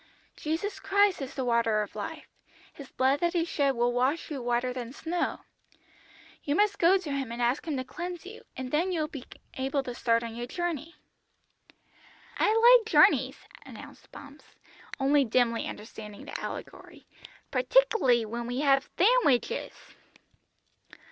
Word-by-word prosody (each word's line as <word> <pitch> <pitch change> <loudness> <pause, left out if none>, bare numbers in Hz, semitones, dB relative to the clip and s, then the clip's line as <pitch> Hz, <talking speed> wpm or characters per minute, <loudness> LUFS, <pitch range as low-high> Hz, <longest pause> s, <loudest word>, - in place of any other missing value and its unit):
"Jesus 325 +7 -3
Christ 400 -4 +2
is 270 0 -6
the 265 - -2
Water 230 -3 +2
of 205 - -11
Life, - - -6 0.5
His 280 -2 -11
blood 265 +2 +2
that 345 +2 0
He 335 -2 +1
shed 280 -5 0
will 240 +1 +1
wash 265 +7 0
you 275 -3 -4
whiter 245 +1 -1
than 245 -1 -6
snow. 340 +4 -3 1.0
You 285 - -1
must 410 +2 +2
go 355 +3 +5
to 355 -6 -6
Him 270 -4 -3
and 235 - -6
ask 245 +7 0
Him 300 -4 -1
to 255 - -2
cleanse 350 +6 -7
you, 425 +4 -10 0.2
and 255 0 -5
then 340 +5 +1
you 335 -3 -1
will 305 - -1
be 275 -4 -8 0.3
able 270 +1 -1
to 250 - -6
start 230 -1 +1
on 230 -1 -6
your 240 +1 -5
journey." 335 0 -4 1.4
"I - - +3
like 465 +1 +6
journeys," - - +4 0.3
announced - - -13
Bumps, 285 +1 -13 0.5
only 280 +1 +3
dimly 230 -1 +1
understanding 210 -1 -9
the - - -6
allegory, - - -8 0.5
"partic'ly 450 - +3
when 235 +2 -5
we 245 +3 -2
have 275 -1 +3
thandwiches." 385 - +2
275 Hz, 155 wpm, -28 LUFS, 245-345 Hz, 1.4 s, like